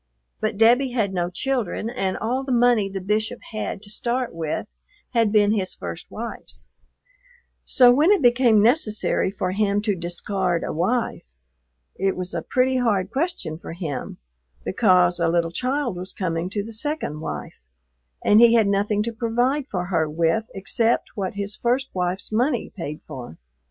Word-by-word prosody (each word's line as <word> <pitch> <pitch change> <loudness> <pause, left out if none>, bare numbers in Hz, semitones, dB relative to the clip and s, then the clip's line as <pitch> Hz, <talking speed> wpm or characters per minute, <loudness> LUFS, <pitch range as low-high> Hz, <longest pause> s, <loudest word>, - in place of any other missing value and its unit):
But - - -2
Debbie 240 +4 +4
had 210 -6 0
no 175 -1 -1
children, 230 +1 -2
and 195 -6 -2
all 250 +4 -1
the 265 - -4
money 240 -4 +3
the 195 0 -4
Bishop 215 +5 -1
had 215 -2 -4
to 205 - -3
start 245 +3 -2
with 160 -2 -4 0.4
had 230 -4 +2
been 210 -1 +4
his 190 -4 -1
first - - -7
wife's; - - -8 1.0
so 250 -3 +6
when 300 +7 +4
it 400 -8 +3
became 240 -3 +5
necessary 220 -6 +2
for 185 -1 -3
him 200 +1 +1
to 210 -2 +1
discard 175 0 -2
a - - -3
wife 205 - -1 0.7
it 195 0 +1
was 180 0 -5
a - - -2
pretty 260 0 +1
hard 210 -6 +1
question 265 - -2
for 165 - -8
him 160 -7 -5 0.5
because 180 -4 +3
a 170 - +2
little 165 0 +1
child 255 -1 -1
was 185 +1 -6
coming 170 -2 -2
to 205 +1 -3
the 225 +2 -8
second 230 - -2
wife - - -7 0.6
and 210 - +6
he 235 0 +7
had 225 -2 +5
nothing 205 +1 +1
to 230 +1 -3
provide 245 +5 0
for 180 -2 -2
her 165 -4 0
with 165 +7 +1
except 225 +4 +1
what 195 -2 -4
his 200 +1 -2
first 250 +3 -1
wife's 180 +2 -1
money 245 +3 0
paid 150 -5 -6
for. 125 - -9
210 Hz, 165 wpm, -23 LUFS, 180-240 Hz, 1.0 s, he